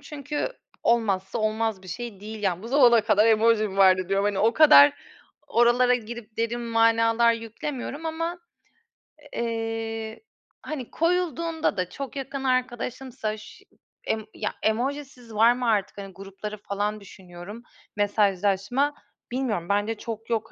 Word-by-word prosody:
çünkü 290 - -4 0.3
olmazsa 210 -3 +1
olmaz 215 -2 -1
bir 185 - -13
şey 215 +1 -6
değil. 215 0 -8
Yani, 185 -1 -1
"Bu 230 - -7
zamana 245 -4 +6
kadar 215 0 +3
emoji 220 -1 +4
mi 195 - -8
vardı?" 185 -2 +5
diyorum. 195 +1 +1
Hani, 205 -2 0
o 225 +2 +3
kadar 295 -2 +8 0.5
oralara 240 +1 +4
girip 235 -2 -7
derin 230 +1 -1
manalar 230 0 +3
yüklemiyorum. 250 +6 -5
Ama, 330 +2 -3 1.0
eee, 225 -1 -3 0.4
hani, 275 -6 -6
koyulduğunda 330 - 0
da 180 -1 -1
çok 275 +7 -7
yakın 270 0 -5
arkadaşımsa 250 -2 -2
ş 210 - -14 0.4
emm 220 -1 -1
Ya, 210 - -3
emojisiz 250 +1 -2
var 230 +3 +6
mı 245 -1 -3
artık? 205 -3 0
Hani, 195 -1 -8
grupları 195 +3 -8
falan 205 +1 -3
düşünüyorum. 190 +4 -11 0.3
Mesajlaşma 205 +6 +1 0.4
Bilmiyorum, 230 -10 -2
bence 205 +3 +1
çok 225 +1 -7
yok. 225 -1 -2
225 Hz, 135 wpm, -25 LUFS, 205-250 Hz, 1.0 s, kadar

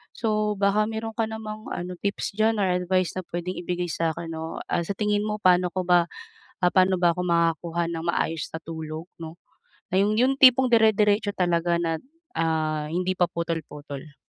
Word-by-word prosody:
So 215 -2 0
baka 205 +1 +3
meron 225 0 -4
ka 225 -1 -1
namang 215 -1 -7
ano 180 +1 -4
tips 200 0 -2
diyan 220 0 +3
or 195 - +2
advice 180 0 +1
na 185 - -2
puwedeng 175 +2 -4
ibigay 175 0 -2
sa 165 -1 0
akin 165 -1 -6
'no, 160 0 -5
ah, - - +1
sa 200 - -2
tingin 210 -1 +1
mo, 210 0 -2
paano 180 -1 +4
ko 185 -1 -2
ba, 175 -1 +4 0.7
paano 185 0 +4
ba 175 -1 +5
ako 180 - -2
makakuha 170 0 +1
ng 165 -1 -4
maayos 165 -2 -1
na - - -4
tulog 160 0 -6 0.2
'no, 160 0 -8 0.6
na - - 0
iyong 210 +2 +2
iyong 265 +2 +3
tipong 260 -1 +7
dire-diretso 210 -2 +4
talaga 170 -1 +1
na 165 -1 -1 0.4
ah, 155 -2 0
hindi 180 +2 0
pa 175 - +3
putol-putol? 150 -3 -5
180 Hz, 180 wpm, -25 LUFS, 165-210 Hz, 0.7 s, tipong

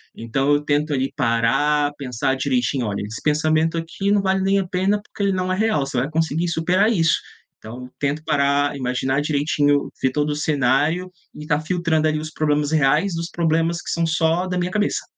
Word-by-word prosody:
Então, 135 +5 0
eu 145 - +2
tento 150 +1 0
ali 135 0 -1
parar, 145 +4 +1
pensar 130 -1 -2
direitinho: 140 - 0
"Olha, 100 -2 -3
esse 105 +2 -6
pensamento 155 +2 +1
aqui 195 +5 -2
não 205 -1 +3
vale 190 0 +1
nem 195 +1 +2
a 190 - -3
pena, 195 +3 0
porque 205 - -7
ele 200 - +2
não 185 0 -1
é - - +1
real.", 220 -6 +1
você 135 - -4
vai 125 +4 0
conseguir 160 +1 0
superar 180 +6 +2
isso. 165 -7 +2 0.4
Então 125 +3 -10
tento 145 +2 -1
parar, 145 -2 +1
imaginar 130 +1 -1
direitinho, 145 -1 +1
ver 130 - +2
todo 150 +2 0
o - - -2
cenário, 150 +4 +1 0.2
e 150 - -9
estar 150 0 0
filtrando 160 -1 0
ali 155 0 0
os 155 0 -6
problemas 150 -1 0
reais 155 +5 +2
dos 165 +1 -4
problemas 165 0 0
que - - -8
são 170 0 0
só 165 +2 +1
da 180 - -3
minha 180 0 -1
cabeça. 210 +1 0
155 Hz, 200 wpm, -21 LUFS, 140-170 Hz, 0.4 s, não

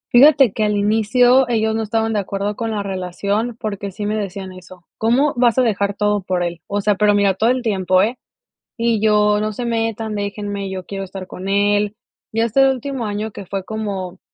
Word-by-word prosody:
Fíjate 270 -4 +7
que 215 - -1
al 210 -1 +1
inicio 230 +5 +3
ellos 220 -1 +1
no 225 - -1
estaban 225 +1 -1
de 210 - +1
acuerdo 200 +1 -3
con 230 -1 -3
la 210 -2 -2
relación 200 +5 -2
porque 200 -3 -4
sí 205 +2 -5
me 210 +1 -1
decían 195 -2 -5
eso: 185 -1 -14
"¿Cómo 255 +6 +2
vas 240 -1 +3
a 255 - +5
dejar 200 -3 0
todo 210 0 +1
por 180 -1 -1
él?". 170 -1 -4
O 205 0 -1
sea, 210 +1 +2
pero 205 +1 +3
mira 200 -1 +3
todo 220 +5 +1
el 255 0 0
tiempo, 185 -4 +2
¿eh? 235 +4 -2 0.6
Y 230 -1 +1
yo: 210 -1 +3
"No 215 0 -1
se 240 +3 -4
metan, 225 -1 -2
déjenme, 205 -1 -4
yo 185 -1 -6
quiero 195 -1 -5
estar 190 0 -8
con 185 +1 -6
él". 205 +1 +1 0.4
Ya 225 +1 +1
este 270 +4 +4
último 265 -1 -3
año 210 +1 -3
que 200 - -9
fue 195 +1 -4
como 195 -4 -5
210 Hz, 210 wpm, -19 LUFS, 195-225 Hz, 0.6 s, Fíjate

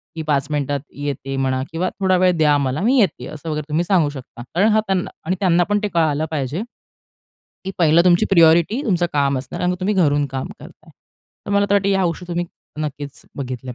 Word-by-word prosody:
की 160 - -4
पाच 145 -3 0
मिनिटात 145 -1 -1 0.2
येते 135 -1 -4
म्हणा 130 -1 0
किंवा 175 +3 -1
थोडा 190 -1 +3
वेळ 185 0 +4
द्या 150 -2 +4
मला. 140 +3 -1
मी 250 +6 +3
येते. 195 -8 +1
असं 155 +2 -8
वगैरे 150 -1 -2
तुम्ही 155 +3 +1
सांगू 175 -5 +2
शकता. 135 -4 -10
कारण 195 +5 +4
हां 215 0 +3
त्यांना 190 -2 0 0.2
आणि 180 +3 0
त्यांना 175 -3 +3
पण 205 0 +2
ते 210 - +1
कळालं 155 -2 +1
पाहिजे 145 +3 -2 1.0
की 190 - -3
पहिलं 170 0 +4
तुमची 175 -1 +4
प्रायोरिटी 170 - +4
तुमचं 175 -5 +1
काम 140 -2 +1
असणार 130 0 -7
आणि 180 0 +1
तुम्ही 200 +3 0
घरून 145 -6 +2
काम 135 -1 -5
करताय. - - -15 0.6
तर - - -4
मला 200 0 +3
तर - - +4
वाटतं 200 -1 +2
या 195 -1 +2
गोष्टी 175 +1 -3
तुम्ही 175 0 -2 0.4
नक्कीच 145 -1 -6
बघितल्या 130 -2 -5
165 Hz, 205 wpm, -20 LUFS, 145-185 Hz, 1.0 s, वेळ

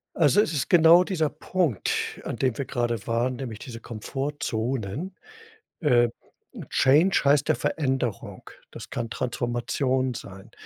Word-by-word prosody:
Also, 165 +5 +4
es 165 -6 -1
ist 140 - -1
genau 170 +1 +7
dieser 160 -6 0
Punkt, 155 - -2
an - - -5
dem 130 -3 0
wir 140 - -2
gerade 120 -4 -2
waren, 120 +2 0
nämlich 120 -5 -6
diese 115 -4 -8
Komfortzone. 130 - -4 0.7
Ähm, 120 -6 +3 0.6
change 155 +9 +4
heißt 145 +2 +3
ja 155 - +4
Veränderung, 130 -7 -2 0.2
das - - -10
kann 115 -2 -4
Transformation 125 +2 -1
sein. 100 -1 -10
130 Hz, 130 wpm, -25 LUFS, 120-150 Hz, 0.7 s, genau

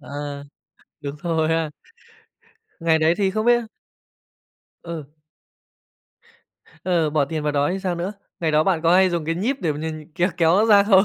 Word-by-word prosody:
À. 145 0 -6 0.6
Đúng 140 -1 -5
rồi 160 -2 +1
ha. 160 -1 +1 1.1
Ngày 165 -1 +3
đấy 160 +2 +3
thì 195 -1 +1
không 215 +3 -2
biết 240 0 +5 1.2
Ừ. 165 -4 -6 1.8
Ờ, 170 -4 +1
bỏ 150 -2 +2
tiền 155 +1 -4
vào 150 -1 0
đó 145 0 +1
thì 195 - -2
sao 185 -2 -1
nữa? 175 +4 -3 0.3
Ngày 165 -2 +1
đó 155 +1 +4
bạn 175 -5 +1
có 170 +1 +4
hay 185 0 +5
dùng 170 -3 -2
cái 165 +1 -1
nhíp 235 +9 -1
để 165 -4 0
m 145 - -6
nh 155 0 -6 0.2
kéo 165 -1 +4
nó 210 - +4
ra 205 -2 +7
không? 195 -2 +5
165 Hz, 180 wpm, -22 LUFS, 155-185 Hz, 1.8 s, ra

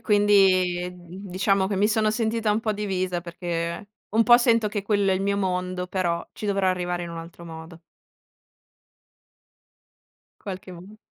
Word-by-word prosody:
quindi, 190 -4 +3
mhmm, 180 +2 -11
diciamo 190 +1 +1
che 200 - -2
mi 200 +2 +3
sono 215 0 +2
sentita 225 0 0
un 210 - +2
po' 220 -1 -1
divisa, 185 -4 -2
perché 170 +1 -4 0.2
un 225 +2 +3
po' 240 0 +8
sento 230 -3 +3
che 205 -1 -3
quello 200 -1 +1
è - - +2
il 185 - -1
mio 200 0 0
mondo, 180 -1 -2
però 175 -2 -1
ci - - -9
dovrò 195 -1 +1
arrivare 180 -1 -1
in 170 - -7
un 165 - -6
altro 165 +1 -10
modo. 165 0 -10 2.6
Qualche 190 -1 -7
m 185 +5 -12
190 Hz, 160 wpm, -25 LUFS, 175-205 Hz, 2.6 s, po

